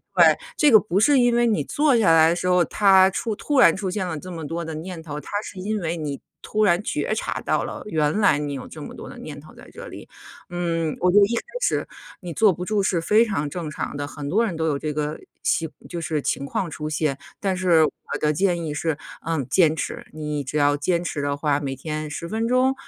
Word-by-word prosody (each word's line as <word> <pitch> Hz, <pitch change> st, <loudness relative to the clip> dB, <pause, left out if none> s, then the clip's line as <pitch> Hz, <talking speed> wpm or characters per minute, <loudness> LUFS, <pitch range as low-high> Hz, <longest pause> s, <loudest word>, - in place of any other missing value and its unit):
对， -, -, +6 dB, 0.2 s
这 300 Hz, -2 st, +5 dB
个 220 Hz, -, +9 dB
不 195 Hz, -2 st, 0 dB
是 280 Hz, +5 st, +5 dB
因 245 Hz, -1 st, +3 dB
为 240 Hz, 0 st, +3 dB
你 215 Hz, -2 st, +1 dB
坐 295 Hz, -3 st, +2 dB
下 210 Hz, -7 st, +4 dB
来 160 Hz, 0 st, +6 dB
的 170 Hz, -, +1 dB
时 180 Hz, -, -2 dB
候， 180 Hz, -1 st, +4 dB
它 190 Hz, -2 st, +5 dB
出 215 Hz, +3 st, -3 dB
突 285 Hz, +5 st, 0 dB
然 170 Hz, -10 st, +7 dB
出 190 Hz, -1 st, -3 dB
现 185 Hz, -1 st, -2 dB
了 160 Hz, -3 st, -3 dB
这 185 Hz, +5 st, -8 dB
么 165 Hz, -3 st, -6 dB
多 170 Hz, +3 st, -3 dB
的 160 Hz, -, -5 dB
念 165 Hz, +2 st, -7 dB
头， 150 Hz, -2 st, -6 dB
它 -, -, -12 dB
是 195 Hz, -, -9 dB
因 210 Hz, +3 st, -2 dB
为 170 Hz, 0 st, -2 dB
你 145 Hz, -3 st, -4 dB, 0.2 s
突 215 Hz, 0 st, 0 dB
然 175 Hz, -2 st, +3 dB
觉 -, -, -1 dB
察 -, -, -3 dB
到 -, -, 0 dB
了 -, -, -7 dB
原 155 Hz, -1 st, 0 dB
来 195 Hz, -8 st, +4 dB
你 145 Hz, -1 st, -3 dB
有 135 Hz, -2 st, -6 dB
这 155 Hz, -, -10 dB
么 -, -, -8 dB
多 -, -, -9 dB
的 -, -, -11 dB
念 145 Hz, -1 st, -8 dB
头 155 Hz, -, -16 dB
在 -, -, -15 dB
这 -, -, -9 dB
里。 -, -, -10 dB, 0.4 s
嗯， 165 Hz, -3 st, -1 dB
我 180 Hz, -, +4 dB
觉 200 Hz, -, +3 dB
得 -, -, +7 dB
一 230 Hz, +4 st, -2 dB
开 -, -, -1 dB, 0.2 s
始 -, -, +1 dB, 0.4 s
你 175 Hz, -3 st, -6 dB
坐 210 Hz, +2 st, +4 dB
不 175 Hz, -, -6 dB
住 210 Hz, +1 st, +1 dB
是 180 Hz, -3 st, +1 dB
非 215 Hz, +7 st, +4 dB
常 150 Hz, -10 st, -2 dB
正 165 Hz, +1 st, -5 dB
常 150 Hz, -, -5 dB
的， 145 Hz, 0 st, -3 dB
很 145 Hz, -1 st, -6 dB
多 220 Hz, +8 st, +2 dB
人 195 Hz, -7 st, -3 dB
都 160 Hz, 0 st, 0 dB
有 145 Hz, -3 st, 0 dB
这 150 Hz, 0 st, -3 dB
个 150 Hz, +1 st, -3 dB, 0.2 s
习 165 Hz, -1 st, +1 dB, 0.2 s
就 175 Hz, -, -4 dB
是 155 Hz, -2 st, -1 dB
情 140 Hz, -, -2 dB
况 170 Hz, +5 st, -2 dB
出 150 Hz, +1 st, -5 dB
现， 150 Hz, -3 st, -1 dB, 0.2 s
但 195 Hz, -2 st, 0 dB
是 175 Hz, -4 st, +4 dB
我 155 Hz, -, +1 dB, 0.3 s
的 150 Hz, -, +3 dB
建 175 Hz, +1 st, +1 dB
议 150 Hz, -, -3 dB
是， 155 Hz, 0 st, -1 dB, 0.3 s
嗯， 160 Hz, -5 st, -1 dB
坚 160 Hz, +1 st, +4 dB
持。 -, -, -5 dB
你 150 Hz, -1 st, -3 dB
只 135 Hz, +2 st, -7 dB
要 145 Hz, 0 st, +3 dB
坚 170 Hz, +4 st, 0 dB
持 155 Hz, -4 st, -3 dB
的 140 Hz, 0 st, -1 dB
话， 145 Hz, -1 st, +1 dB
每 135 Hz, -2 st, -4 dB
天 155 Hz, +2 st, -5 dB
10 165 Hz, +3 st, -6 dB
分 225 Hz, +2 st, -1 dB
钟， 255 Hz, +2 st, +3 dB
170 Hz, 270 characters per minute, -23 LUFS, 150-200 Hz, 0.4 s, 个